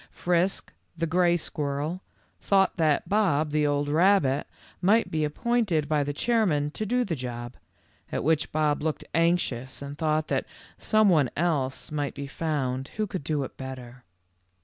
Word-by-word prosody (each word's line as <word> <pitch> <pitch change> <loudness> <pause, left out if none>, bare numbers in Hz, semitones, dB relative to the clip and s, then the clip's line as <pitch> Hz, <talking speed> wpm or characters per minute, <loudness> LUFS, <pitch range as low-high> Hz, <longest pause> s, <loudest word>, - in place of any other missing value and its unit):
Frisk, 180 +2 0 0.2
the 165 - 0
gray 175 +1 +3
squirrel, 150 +2 -3 0.4
thought 195 -1 +2
that 155 -3 +2
Bob, 170 -8 +2
the 150 0 +2
old 145 0 0
rabbit, 155 -3 +3 0.3
might 215 +5 +3
be 155 -1 0
appointed 180 -1 0
by 150 -2 +2
the 145 - -2
chairman 155 -6 +1
to 215 +7 -4
do 250 +3 +1
the 170 - -2
job, 120 -2 -6 0.6
at - - -2
which 155 0 +1
Bob 150 -1 +1
looked 155 0 -2
anxious 165 -7 0
and 140 +1 -8
thought 155 -1 +1
that - - -1 0.3
some 215 -1 +3
one 155 -9 +4
else 145 -7 -1
might 145 -2 -2
be 140 - -5
found 135 -3 -2
who 215 - +1
could 185 -6 -5
do 150 -1 -1
it - - -8
better. 130 -2 -8
155 Hz, 160 wpm, -27 LUFS, 140-180 Hz, 0.6 s, one